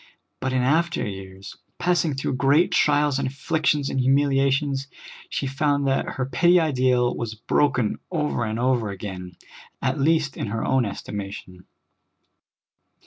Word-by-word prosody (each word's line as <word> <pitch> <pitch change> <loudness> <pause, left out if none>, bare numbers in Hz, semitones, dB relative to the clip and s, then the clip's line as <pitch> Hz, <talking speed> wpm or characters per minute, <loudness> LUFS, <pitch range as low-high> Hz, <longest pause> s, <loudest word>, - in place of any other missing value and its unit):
But 130 - -2
in 130 -1 +1
after 165 +4 +1
years, 95 0 -9 0.2
passing 175 -4 +1
through 135 - -2
great 140 +7 +3
trials 145 -2 +2
and 135 - -1
afflictions 145 +1 0
and 135 - -2
humiliations, 135 +1 +2 0.4
she - - -2
found 140 +1 0
that 135 0 0
her 130 - -1
petty 175 +6 +4
ideal 130 -5 +2
was 110 -2 -4
broken 125 0 +1
over 150 -8 -1
and 110 0 -2
over 120 -3 +1
again, 95 -2 -7 0.5
at 135 +2 -1
least 150 -2 +1
in - - -3
her 110 +2 -3
own 130 -2 +2
estimation. 100 -2 -7
135 Hz, 140 wpm, -24 LUFS, 115-145 Hz, 0.5 s, petty